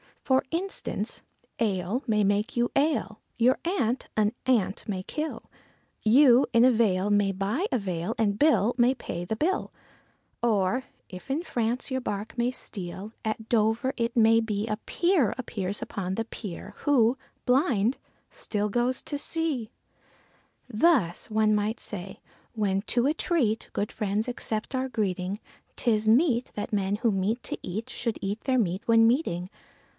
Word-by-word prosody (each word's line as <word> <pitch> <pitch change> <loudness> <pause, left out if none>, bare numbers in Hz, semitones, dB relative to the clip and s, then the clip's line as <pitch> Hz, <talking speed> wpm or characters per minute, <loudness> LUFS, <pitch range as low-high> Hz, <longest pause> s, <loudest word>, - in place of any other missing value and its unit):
For 265 -1 +3
instance, 330 - -3 0.4
ale 205 +2 0
may 210 -2 +2
make 205 +3 +1
you 240 0 +1
ail, 275 -7 +1 0.2
your 250 +3 +3
aunt 265 - 0
an 210 -1 +3
ant 210 -7 +1
may 190 -3 -3
kill, 310 +8 -4 0.6
You 250 +3 +6
in 230 0 +6
a 255 - +7
vale 205 -4 +2
may 205 -1 +3
buy 205 - -1
a 255 - +2
veil 180 -5 -3
and 205 -2 +1
Bill 285 -7 +4
may 245 +2 +4
pay 175 -8 -5
the 220 - -2
bill. 335 - -1 0.7
Or, 230 +2 +1 0.2
if 185 -1 -10
to 280 +5 -1
France 240 -3 -2
your 260 0 -1
bark 205 -2 -4
may 240 +1 +2
steer, 195 -4 -6
at 220 0 -3
Dover 225 +3 +2
it 235 -1 -1
may 225 -1 +5
be, 215 -1 -2
A 215 -1 -1
peer 340 - +1
appears 205 -6 -3
upon 190 -1 -4
the 225 - -2
pier, 205 -2 -8
who, 250 -5 +3 0.3
blind, 250 -3 +2 0.3
still 210 - -2
goes 240 +4 0
to 290 - -3
sea. 295 -7 -2 1.0
Thus, 225 - +2
one 215 0 +3
might 210 +2 0
say, 190 -2 -6 0.3
when 200 -4 0
to 240 +2 +1
a 290 - +3
treat 270 - 0
good 205 - -2
friends 210 +2 -1
accept 225 -1 -3
our 260 0 0
greeting, 195 -3 -2 0.4
'Tis 220 -3 +1
meet 250 +1 +3
that 210 - -4
men 200 -1 +1
who 230 0 +2
meet 205 +5 -1
to - - -3
eat 215 +6 -5
should 230 -2 -2
eat 200 +3 -3
their 260 -1 +2
meat 190 -4 0
when 225 -1 +6
meeting. 225 - +1
225 Hz, 160 wpm, -27 LUFS, 205-255 Hz, 1.0 s, a